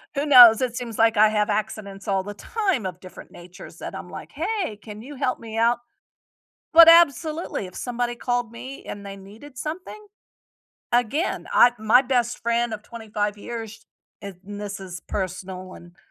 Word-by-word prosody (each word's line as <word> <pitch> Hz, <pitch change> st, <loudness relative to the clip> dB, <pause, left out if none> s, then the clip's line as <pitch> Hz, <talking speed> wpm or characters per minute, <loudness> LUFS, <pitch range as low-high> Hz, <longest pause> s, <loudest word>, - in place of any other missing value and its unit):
Who 280 Hz, +1 st, -1 dB
knows, 245 Hz, -6 st, +9 dB
it 245 Hz, -2 st, -2 dB
seems 235 Hz, -3 st, -6 dB
like 225 Hz, -1 st, +3 dB
I 215 Hz, +1 st, +7 dB
have 210 Hz, 0 st, 0 dB
accidents 205 Hz, -1 st, -4 dB
all 195 Hz, -1 st, 0 dB
the 205 Hz, +2 st, -7 dB
time 385 Hz, -, -2 dB
of 185 Hz, -1 st, -6 dB
different 185 Hz, -, -13 dB
natures 175 Hz, +1 st, -13 dB
that -, -, -7 dB
I'm -, -, -8 dB
like, -, -, -10 dB
"Hey, 390 Hz, -, -3 dB
can 210 Hz, 0 st, -11 dB
you 285 Hz, +5 st, -10 dB
help 255 Hz, -1 st, -2 dB
me 225 Hz, -1 st, -8 dB
out?" 230 Hz, +1 st, +2 dB, 0.9 s
but 330 Hz, 0 st, +10 dB
absolutely, 320 Hz, -, +3 dB
if 180 Hz, -, -14 dB
somebody 245 Hz, -1 st, -3 dB
called 245 Hz, -1 st, -2 dB
me 260 Hz, +3 st, -9 dB
and 205 Hz, 0 st, -8 dB
they 195 Hz, 0 st, -7 dB
needed 215 Hz, +8 st, -14 dB
something, 365 Hz, +9 st, -7 dB, 0.9 s
again, 245 Hz, -, 0 dB
I 245 Hz, -, +6 dB
My 220 Hz, +4 st, +5 dB
best 245 Hz, -2 st, 0 dB
friend 235 Hz, 0 st, 0 dB
of 210 Hz, -, -6 dB
25 210 Hz, -3 st, -4 dB
years, 225 Hz, 0 st, -8 dB, 0.4 s
and 200 Hz, -2 st, -8 dB
This 205 Hz, 0 st, -7 dB
is 180 Hz, -2 st, -9 dB
personal 185 Hz, -1 st, -5 dB
and 175 Hz, 0 st, -15 dB
225 Hz, 170 wpm, -23 LUFS, 205-250 Hz, 0.9 s, but